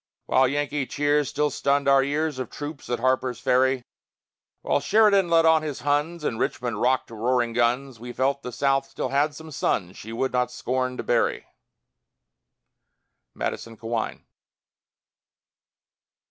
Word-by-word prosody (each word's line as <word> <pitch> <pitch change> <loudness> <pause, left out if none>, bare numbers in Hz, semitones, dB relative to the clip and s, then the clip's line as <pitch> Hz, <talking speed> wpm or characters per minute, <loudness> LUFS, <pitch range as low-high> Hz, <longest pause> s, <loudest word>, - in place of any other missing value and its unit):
While 130 0 +4
Yankee 145 0 -1
cheers 145 0 +1
still 150 0 0
stunned 140 +1 +1
our 135 -1 +5
ears, 145 0 -1
Of 130 - -4
troops 145 -1 -7
at 120 - 0
Harper's 130 -1 0
Ferry, 130 0 +2 0.8
While - - +2
Sheridan 200 -4 +4
led 165 -1 +4
on 160 -1 +5
his 150 -3 -5
Huns, 150 +3 0
And 115 -6 -2
Richmond 120 -4 -2
rocked 130 +1 +1
to - - -11
roaring 120 +1 0
guns, 120 +1 0
We 120 +1 -7
felt 135 +3 0
the 125 - -6
South 135 +2 +1
still 130 - -4
had 145 +2 +1
some 160 +1 -10
sons 95 -9 -1
She 110 - -9
would 125 +3 -2
not 125 0 +1
scorn 125 +1 -2
to - - -4
bury. - - +1 1.9
MADISON 115 -1 -4
CAWEIN. 115 0 -4
135 Hz, 145 wpm, -25 LUFS, 125-145 Hz, 1.9 s, our